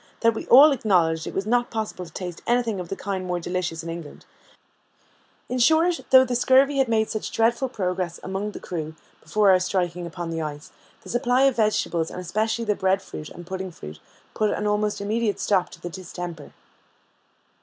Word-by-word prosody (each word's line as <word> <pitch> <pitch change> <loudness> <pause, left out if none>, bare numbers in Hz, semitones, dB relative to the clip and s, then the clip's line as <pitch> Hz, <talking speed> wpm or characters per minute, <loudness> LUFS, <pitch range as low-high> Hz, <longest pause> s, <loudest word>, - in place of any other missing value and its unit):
that 230 0 +4
we 220 - -6
all 285 +5 +9
acknowledged 175 - +1
it - - -5
was 195 - -1
not 240 +2 +1
possible 215 -4 -4
to 170 - -11
taste 180 -3 -6
anything 235 -4 +1
of 175 -2 -6
the - - -3
kind 195 -1 -4
more 180 -1 -2
delicious 175 -2 -3
in 165 - -6
England: 165 -3 -9 1.2
in 255 - -2
short, 320 +7 +4
though 260 0 +7
the 250 -1 -2
scurvy 270 +3 +4
had 265 - +3
made 220 -1 +2
such 215 - -3
dreadful 235 +3 +1
progress 180 -6 -3
among 195 +2 -3
the - - -8
crew 160 -3 -5 0.3
before 200 +5 +3
our 185 - +5
striking 180 -2 -1
upon 170 0 -6
the 165 0 -3
ice, 150 -1 -6 0.3
the - - -13
supply 245 +2 +2
of 270 -2 +4
vegetables, 190 -7 +1
and - - -7
especially 220 +6 -1
the 210 - +2
bread 190 -1 +1
fruit 155 -5 -9
and 175 - -11
pudding 190 +1 -5
fruit, 75 - -10 0.3
put 215 -1 +1
an 210 - -2
almost 210 0 0
immediate 215 +1 -1
stop 185 -3 +1
to - - -13
the - - -6
distemper. 175 -3 -7
195 Hz, 195 wpm, -24 LUFS, 175-230 Hz, 1.2 s, all